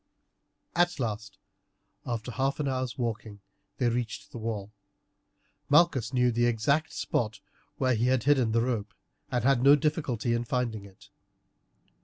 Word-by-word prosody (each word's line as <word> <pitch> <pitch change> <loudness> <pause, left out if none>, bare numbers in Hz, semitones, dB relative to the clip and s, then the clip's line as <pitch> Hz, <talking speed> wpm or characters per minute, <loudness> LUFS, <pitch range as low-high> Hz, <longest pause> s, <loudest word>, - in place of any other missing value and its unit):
At 175 -1 +2
last, 110 -4 -4 0.7
after 120 0 -3
half 135 +4 -1
an 145 - -1
hour's 130 -2 -2
walking, 110 -4 -4 0.4
they 125 - +1
reached 120 -1 -3
the 120 - -7
wall. 105 -2 -4 1.0
Malchus 145 -7 +4
knew 125 -2 +3
the 120 +1 +2
exact 140 +7 +1
spot 110 -2 -2 0.4
where 130 -1 +2
he 120 +2 +1
had 130 -3 +2
hidden 130 -5 +3
the 115 +1 +2
rope, 115 -4 -2 0.3
and 125 - -1
had 135 -1 +3
no 140 +2 +8
difficulty 145 -6 -1
in 120 0 0
finding 115 -4 -2
it. 95 -1 -17
120 Hz, 145 wpm, -28 LUFS, 110-135 Hz, 1.0 s, no